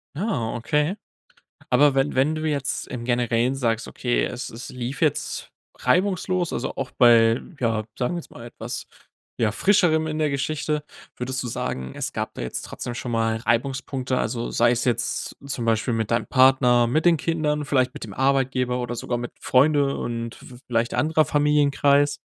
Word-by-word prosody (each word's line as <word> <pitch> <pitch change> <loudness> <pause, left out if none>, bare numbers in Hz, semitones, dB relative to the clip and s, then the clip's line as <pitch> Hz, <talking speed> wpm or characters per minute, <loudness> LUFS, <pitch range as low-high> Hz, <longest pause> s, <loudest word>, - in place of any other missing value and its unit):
Ah, 150 - -2
okay. 150 - 0 0.7
Aber 145 -2 +4
wenn 135 +2 +1
wenn 140 +4 +2
du 155 - -4
jetzt 140 -3 -2
im 120 -2 -6
Generellen 120 +1 +1
sagst: 115 -4 -1
„Okay, 120 -1 0
es 125 - -5
es 115 +2 -9
lief 125 +2 -5
jetzt 155 -3 -1 0.3
reibungslos, 185 +3 +1
also, 130 - -3
auch 135 - -4
bei, 115 -1 +5 0.2
ja, 115 -3 0
sagen 130 +7 -1
wir - - -2
jetzt - - -12
mal, 120 - -11
etwas, 120 0 -6 0.5
ja, 110 -3 +1
Frischerem 175 - +3
in 155 0 -3
der 155 -1 +2
Geschichte.“ 150 +2 -2 0.3
Würdest 130 +1 -3
du - - -4
sagen, 115 - -4
es - - -3
gab - - -3
da - - -6
jetzt 60 - -4
trotzdem 120 - -6
schon 120 0 -5
mal 115 -1 +1
Reibungspunkte, 130 +2 -1
also, 120 -1 -2
sei 120 0 +3
es 120 0 0
jetzt 120 -1 -1
zum 125 -4 -3
Beispiel 115 +2 +1
mit 110 -1 -2
deinem 115 - +1
Partner, 130 -2 +5
mit 155 +7 0
den 170 -2 +5
Kindern, 150 -2 -1
vielleicht 130 -3 +1
mit - - -7
dem 105 -3 -8
Arbeitgeber 130 -1 +1
oder 120 -1 -3
sogar 120 +1 -3
mit 120 0 -5
Freunde 140 +1 +3
und 115 -1 -4
v 125 - -13
vielleicht 115 -1 0
anderer 155 0 +2
Familienkreis? 145 0 +3
130 Hz, 175 wpm, -24 LUFS, 120-145 Hz, 0.7 s, bei